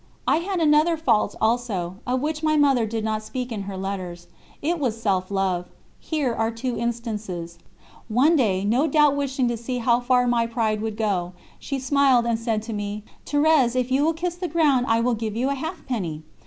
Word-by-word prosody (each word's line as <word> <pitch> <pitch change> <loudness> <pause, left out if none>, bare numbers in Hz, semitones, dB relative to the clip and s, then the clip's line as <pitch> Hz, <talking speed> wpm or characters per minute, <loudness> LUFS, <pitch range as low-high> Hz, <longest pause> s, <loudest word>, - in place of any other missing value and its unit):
I - - +4
had 365 +2 -2
another 315 +1 +4
fault 235 -9 +1
also, 220 -6 -1
of 250 +1 0
which 305 +1 -2
my 310 -1 +2
Mother 270 -6 +3
did 220 0 -3
not 215 0 -1
speak 245 +3 -5
in 215 -3 -3
her 195 - -5
letters: 185 -3 -5 0.3
it 335 +3 -1
was 235 -6 -1
self 190 -4 0
love. 190 -3 -1 0.3
Here 290 -7 -1
are 225 0 0
two 235 +2 -3
instances: 210 -8 -4 0.5
One 260 +9 +3
day, 200 -9 +1
no 245 +9 +2
doubt 300 -3 +4
wishing 270 -2 0
to 240 - -2
see 245 +2 -4
how 240 0 +2
far 250 0 +2
my 235 -1 +2
pride 220 -2 -1
would 220 -1 -4
go, 190 -5 -1 0.3
she 275 - -4
smiled 265 -2 +3
and 230 -1 0
said 225 -2 -1
to 225 0 -5
me, 205 0 -4 0.2
"Thérèse, 290 -4 +3
if 255 0 0
you 270 +2 +3
will 325 +2 +2
kiss 345 +2 -3
the 355 +1 -4
ground 290 -6 +2
I 225 0 +3
will 245 +1 +1
give 220 -1 -3
you 255 +4 0
a - - +1
halfpenny." 245 - -4
235 Hz, 200 wpm, -24 LUFS, 215-280 Hz, 0.5 s, I